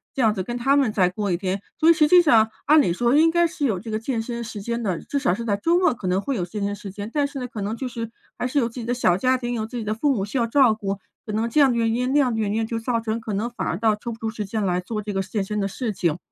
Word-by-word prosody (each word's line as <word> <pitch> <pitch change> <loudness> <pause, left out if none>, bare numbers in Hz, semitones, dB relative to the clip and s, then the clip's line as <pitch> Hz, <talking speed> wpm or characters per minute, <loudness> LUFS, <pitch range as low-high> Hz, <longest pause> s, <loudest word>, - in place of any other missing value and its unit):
这 270 - 0
样 220 - +4
子 190 - -3
跟 240 +6 -4
他 270 +3 +2
们 270 -6 +3
再 185 -4 +3
过 200 +1 -2
一 170 - +1
天。 190 +1 -2 0.2
所 320 - +3
以 335 - +9
实 310 -2 +4
际 360 +4 +7
上 225 -9 +4 0.2
按 305 0 +6
理 175 - +1
说 240 +6 +2
应 320 +2 +6
该 345 +1 +3
是 330 -3 -2
有 195 -5 -1
这 220 +2 -7
个 215 - -1
健 230 +1 -2
身 235 0 -5
时 220 -2 -7
间 235 +2 -3
的， 190 -6 -1
至 285 - -2
少 220 -10 +1
是 235 - -5
在 205 -3 +1
周 330 +12 +2
末 360 -6 +3
可 205 -5 -6
能 180 +1 +2
会 270 +6 -2
有 180 - -1
健 200 +4 -5
身 200 0 -1
时 200 0 -8
间， 205 +3 -7
但 290 -2 +1
是 280 - -9
呢， 250 -1 -4
可 220 -3 -7
能 210 +3 -2
就 260 - -3
是 230 -2 -5 0.3
还 250 - -1
是 275 - -3
有 240 -5 +3
自 230 - -12
己 - - -5
的 240 - -2
小 185 -8 +3
家 255 +5 +2
庭， 245 -1 -3
有 220 -2 -2
自 245 - -7
己 230 - -3
的 215 0 -1
父 280 +6 +1
母 195 -3 -1
需 230 +6 -2
要 230 - +1
照 250 -2 +4
顾， 200 -2 -3 0.3
可 215 - -3
能 220 +2 0
这 290 +6 +3
样 275 - +6
的 240 - 0
原 225 -1 +1
因 250 +2 0
那 290 - +3
样 255 -4 +2
的 225 - -2
原 210 -2 0
因， 225 0 0
就 225 0 -3
造 230 0 -1
成 225 0 -2
可 220 -1 -5
能 210 +4 -1
反 235 - -4
而 - - -1
倒 220 +1 +2
抽 235 +3 -6
不 225 - -7
出 220 -1 -3
时 215 -1 -5
间 210 +1 -2
来 180 -1 +1
做 210 +4 -4
这 205 - -4
个 195 - 0
健 195 +2 -2
身 210 +2 -3
的 195 - 0
事 220 +2 -3
情。 170 -3 0
225 Hz, 380 characters per minute, -23 LUFS, 205-250 Hz, 0.3 s, 以